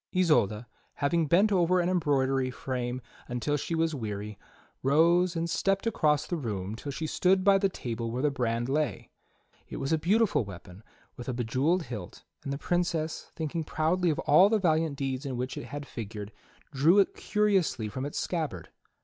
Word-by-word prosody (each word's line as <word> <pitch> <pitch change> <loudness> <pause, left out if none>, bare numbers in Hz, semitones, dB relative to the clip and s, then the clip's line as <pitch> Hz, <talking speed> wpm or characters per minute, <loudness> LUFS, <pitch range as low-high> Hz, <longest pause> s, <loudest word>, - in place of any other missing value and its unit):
Isolda, 125 - +2 0.3
having 160 +3 +1
bent 195 +8 +4
over 180 -1 +3
an 175 - +1
embroidery 135 -7 +1
frame 125 -1 -4 0.2
until 125 +4 -1
she 155 +3 -2
was 165 0 +1
weary, 105 -5 -5 0.4
rose 170 +6 +3
and 165 0 -1
stepped 195 +5 0
across 150 -9 +2
the 175 - -3
room 105 - -4
till 140 +5 -6
she 155 +4 -4
stood 185 +4 +2
by 200 0 +5
the 195 0 +2
table 115 -8 -4
where 125 +4 -3
the 150 - +3
brand 120 -3 -1
lay. 140 -5 -1 0.6
It - - -6
was 135 +4 -1
a 160 - +2
beautiful 205 - +2
weapon 95 -1 -11 0.4
with 120 +1 -6
a 125 - -2
bejewelled 130 +9 +1
hilt, 105 - -8 0.2
and 140 - -4
the 140 - -2
Princess, 170 -1 -1
thinking 160 0 -3
proudly 165 +4 +1
of 155 - 0
all 180 +7 +5
the 220 - +3
valiant 160 -5 +1
deeds 135 -1 -2
in 135 -3 -4
which 125 +1 -3
it - - -6
had 145 +1 -6
figured, 105 -4 -7 0.4
drew 155 +7 +4
it 200 - +4
curiously 195 - +1
from 130 +5 -5
its 145 - -4
scabbard. 150 - -3
145 Hz, 180 wpm, -28 LUFS, 125-170 Hz, 0.6 s, by